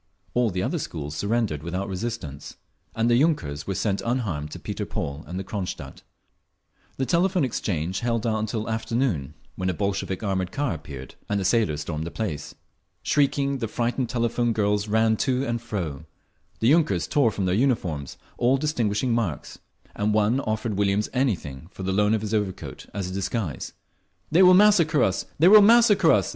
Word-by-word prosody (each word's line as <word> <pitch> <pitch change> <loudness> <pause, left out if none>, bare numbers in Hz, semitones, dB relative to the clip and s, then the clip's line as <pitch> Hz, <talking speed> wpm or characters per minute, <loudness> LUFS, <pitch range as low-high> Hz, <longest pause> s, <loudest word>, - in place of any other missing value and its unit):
All 120 -2 +2
the 90 -1 -2
other - - -1
schools 75 0 -5
surrendered 100 -5 -1
without 90 +4 -3
resistance, 95 -8 -5 0.4
and 115 +1 +1
the 120 - +4
yunkers 80 - 0
were 95 - -2
sent 100 +1 0
unharmed 105 - -2
to - - -8
Peter - - -4
Paul 70 +1 -4
and 90 +4 -5
Cronstadt…. 95 -3 -5 1.0
The 135 - 0
Telephone 180 +2 +2
Exchange 95 - -2
held 115 -2 -1
out 110 -1 +1
until 110 0 -3
afternoon, 110 - -1 0.2
when 95 0 -2
a 90 - -1
Bolshevik 100 0 -2
armoured 95 -3 -1
car 145 -7 -1
appeared, 70 -4 -9 0.2
and 100 0 +1
the 95 - -2
sailors 95 -8 +2
stormed 80 0 -4
the - - -3
place. 85 -8 -4 0.5
Shrieking, 140 -1 +1
the 115 - -2
frightened 120 +2 -1
telephone 120 0 0
girls 105 -1 +1
ran 110 +1 +2
to 130 +2 0
and 120 -2 -2
fro; 80 -10 -4 0.6
the 115 - +4
yunkers 100 - +2
tore 140 -6 +3
from 100 -3 -2
their 90 - +1
uniforms 95 - 0 0.2
all 125 +3 +3
distinguishing 125 -5 0
marks, 105 -11 -3 0.4
and 105 +1 0
one 110 +4 +3
offered 110 -4 -2
Williams 100 +1 +1
anything 85 - -1
for 95 - -8
the 95 - -1
loan 105 +2 +3
of 110 - -2
his 110 0 -4
overcoat, 105 -4 -3
as 95 -3 -4
a - - -6
disguise…. 95 - -3 0.6
"They 170 +4 +5
will 185 -1 +8
massacre 175 -8 +5
us! 95 - 0
They 165 - +5
will 210 +2 +9
massacre 225 0 +6
us!" - - +2
110 Hz, 175 wpm, -25 LUFS, 95-125 Hz, 1.0 s, will